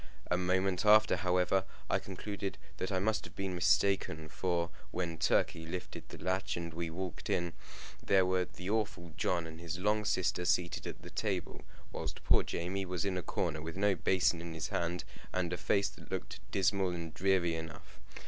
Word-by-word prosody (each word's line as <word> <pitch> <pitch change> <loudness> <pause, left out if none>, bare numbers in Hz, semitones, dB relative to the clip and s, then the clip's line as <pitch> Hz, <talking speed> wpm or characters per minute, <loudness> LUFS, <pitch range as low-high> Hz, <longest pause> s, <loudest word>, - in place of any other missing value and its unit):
A - - +5
moment 90 +1 +1
after, 110 0 +7
however, 90 +1 +2 0.2
I - - +2
concluded 100 +1 -5 0.2
that 95 - -2
I 95 - +1
must 110 +3 +1
have - - -11
been 95 -1 -2
mistaken, 85 -3 +2
for, 85 0 0 0.2
when 85 -3 -3
Turkey 80 0 +2
lifted 90 +1 -6
the - - -8
latch 95 0 -1
and 85 -1 -4
we 85 0 -2
walked 90 +2 -5
in, 85 -1 +1 0.5
there 95 -2 +5
were 90 0 +2
the 90 +1 -9
awful 100 -6 -1
John 85 -2 +1
and 80 0 -8
his 85 0 -3
long 105 +3 +2
sister 90 -2 +1
seated 85 0 +1
at - - -7
the - - -9
table, - - -2 0.3
while - - -3 0.2
poor - - +6
Jamie 95 +3 -2
was 90 0 -2
in 95 -2 0
a 90 - -1
corner, 80 -1 -1
with 80 +3 -5
no 100 0 +4
basin 90 -1 +2
in 85 -1 -6
his 80 - -3
hand, 85 0 -1 0.3
and 90 -1 0
a - - -1
face 100 +6 +2
that - - -14
looked - - -4
dismal 95 0 +2
and 85 -3 -4
dreary 90 0 +2
enough. 80 -1 -7
90 Hz, 185 wpm, -34 LUFS, 85-95 Hz, 0.5 s, after